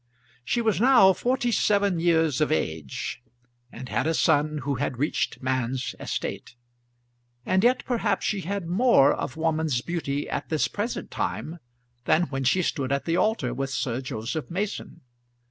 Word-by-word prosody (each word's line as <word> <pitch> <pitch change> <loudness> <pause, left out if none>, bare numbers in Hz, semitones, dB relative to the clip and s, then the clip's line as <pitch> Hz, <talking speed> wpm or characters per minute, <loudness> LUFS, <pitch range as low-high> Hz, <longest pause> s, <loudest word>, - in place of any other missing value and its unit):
She 235 - 0
was 220 -3 +1
now 240 -7 +7
forty 245 +4 0
seven 200 -4 +2
years 165 -4 +2
of 155 - +2
age, 80 - -3 0.5
and 130 +2 -8
had 155 - -1
a 165 - +1
son 150 -1 +2
who 140 0 -1
had 130 -3 -2
reached 145 -1 -1
man's 130 0 -1
estate; - - -5 0.9
and 190 +1 +2
yet 250 +2 +3
perhaps 225 -5 0
she 200 -2 0
had 195 +1 -3
more 175 - +4
of - - -5
woman's 160 -5 0
beauty 145 -3 -3
at - - -4
this 155 -2 +1
present 210 +4 -4
time 170 +2 -3 0.5
than 165 - +3
when 135 -1 -2
she 180 +9 +3
stood 135 -5 -2
at 140 0 0
the 165 - 0
altar 180 - +1
with 135 +1 -3
Sir 130 -1 -2
Joseph 120 +3 -4
Mason. 190 -2 -4
160 Hz, 160 wpm, -26 LUFS, 135-195 Hz, 0.9 s, now